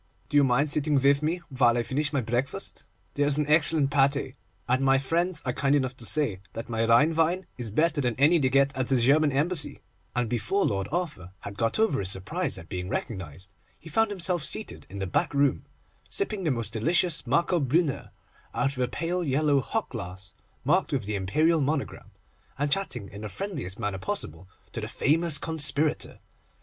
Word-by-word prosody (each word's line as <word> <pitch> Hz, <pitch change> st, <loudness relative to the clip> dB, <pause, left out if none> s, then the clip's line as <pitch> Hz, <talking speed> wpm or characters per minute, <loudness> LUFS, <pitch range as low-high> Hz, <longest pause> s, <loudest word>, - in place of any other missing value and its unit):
Do 145 Hz, -, +2 dB
you 145 Hz, -, +6 dB
mind 135 Hz, +3 st, +2 dB
sitting 150 Hz, 0 st, +1 dB
with 140 Hz, +1 st, +3 dB
me 170 Hz, +3 st, -1 dB
while 120 Hz, -3 st, +3 dB
I 120 Hz, -, +1 dB
finish 140 Hz, +4 st, -1 dB
my 140 Hz, -3 st, 0 dB
breakfast? 120 Hz, +3 st, -2 dB, 0.3 s
There 145 Hz, 0 st, +1 dB
is 145 Hz, 0 st, +2 dB
an 150 Hz, -, +1 dB
excellent 150 Hz, -1 st, +3 dB
pâté, 140 Hz, -1 st, +2 dB, 0.3 s
and 130 Hz, +2 st, +2 dB
my 135 Hz, 0 st, +4 dB
friends 165 Hz, +4 st, -1 dB
are 125 Hz, -, -1 dB
kind 140 Hz, +2 st, +2 dB
enough 130 Hz, -3 st, 0 dB
to 120 Hz, -, -6 dB
say 140 Hz, -12 st, 0 dB
that 115 Hz, +1 st, -6 dB
my 115 Hz, 0 st, 0 dB
Rhine 150 Hz, +8 st, +5 dB
wine 165 Hz, +3 st, +1 dB
is 120 Hz, -3 st, -2 dB
better 155 Hz, +6 st, +1 dB
than 120 Hz, -3 st, 0 dB
any 155 Hz, +5 st, +4 dB
they 130 Hz, -3 st, +2 dB
get 140 Hz, +1 st, +3 dB
at 130 Hz, -1 st, -1 dB
the 135 Hz, -, +3 dB
German 145 Hz, +5 st, +4 dB
Embassy,' 145 Hz, 0 st, +2 dB, 0.4 s
and 120 Hz, -1 st, 0 dB
before 120 Hz, -, 0 dB
Lord 95 Hz, -2 st, -1 dB
Arthur 150 Hz, -, -3 dB
had 100 Hz, -, -7 dB
got 115 Hz, +2 st, +1 dB
over 220 Hz, -11 st, +2 dB
his 95 Hz, -, 0 dB
surprise 95 Hz, -1 st, -1 dB
at 85 Hz, -, -10 dB
being 90 Hz, 0 st, -5 dB
recognised, 95 Hz, -, -5 dB, 0.3 s
he 160 Hz, -, -12 dB
found 225 Hz, +5 st, +3 dB
himself 180 Hz, -3 st, 0 dB
seated 215 Hz, -, -5 dB
in 100 Hz, -, -8 dB
the 95 Hz, -, -2 dB
back 95 Hz, +9 st, -1 dB
room, 140 Hz, 0 st, +2 dB, 0.4 s
sipping 215 Hz, -, -2 dB
the -, -, +2 dB
most 115 Hz, -5 st, -2 dB
delicious 165 Hz, +8 st, +2 dB
Marcobrünner 150 Hz, +1 st, +1 dB, 0.5 s
out 140 Hz, 0 st, 0 dB
of 130 Hz, -, -3 dB
a 125 Hz, -, +2 dB
pale 175 Hz, +5 st, -2 dB
yellow 145 Hz, -1 st, +2 dB
hock 225 Hz, -, -3 dB
glass 95 Hz, -4 st, -8 dB, 0.3 s
marked -, -, +2 dB
with 130 Hz, -7 st, -1 dB
the 105 Hz, -, -3 dB
Imperial 155 Hz, -, +2 dB
monogram, 140 Hz, +1 st, -2 dB, 0.5 s
and 145 Hz, +1 st, -1 dB
chatting 130 Hz, -, -1 dB
in 100 Hz, -, -10 dB
the 105 Hz, -, -5 dB
friendliest 140 Hz, -, -5 dB
manner 100 Hz, -2 st, -3 dB
possible 90 Hz, -1 st, -5 dB, 0.2 s
to -, -, -5 dB
the -, -, -4 dB
famous 160 Hz, +1 st, +1 dB
conspirator. 155 Hz, -1 st, 0 dB
140 Hz, 195 wpm, -27 LUFS, 115-155 Hz, 0.5 s, you